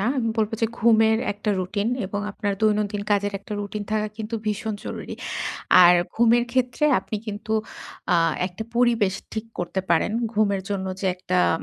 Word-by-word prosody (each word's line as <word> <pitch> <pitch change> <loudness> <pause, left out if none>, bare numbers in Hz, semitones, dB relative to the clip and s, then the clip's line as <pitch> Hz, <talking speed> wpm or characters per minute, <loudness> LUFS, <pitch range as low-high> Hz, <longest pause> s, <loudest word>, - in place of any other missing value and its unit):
না। 205 - 0
আমি 230 -3 0
বলব 215 -1 +2
যে, - - +5
ঘুমের 220 -1 +4
একটা 205 +1 -2
routine 200 +5 -1 0.2
এবং 205 +1 -3
আপনার 205 -1 -2
দৈনন্দিন 210 -1 +1
কাজের 205 0 +2
একটা 200 - -10
routine 205 0 -5
থাকা 215 0 0
কিন্তু 220 +1 -5
ভীষণ 215 +1 -1
জরুরি। - - -6 0.7
আর 175 - +8 0.2
ঘুমের 235 +1 +4
ক্ষেত্রে 255 +3 +1 0.2
আপনি 215 - -4
কিন্তু 210 +1 -4 0.6
আ - - +6 0.3
একটা 185 +4 -6
পরিবেশ 235 -6 +3 0.2
ঠিক 220 +1 -4
করতে 175 +2 -2
পারেন। 170 +4 +3 0.2
ঘুমের 200 -2 +2
জন্য 190 -1 -2
যে 195 - -1
একটা 185 0 -1 0.2
আম - - -8
210 Hz, 170 wpm, -24 LUFS, 200-225 Hz, 0.7 s, আর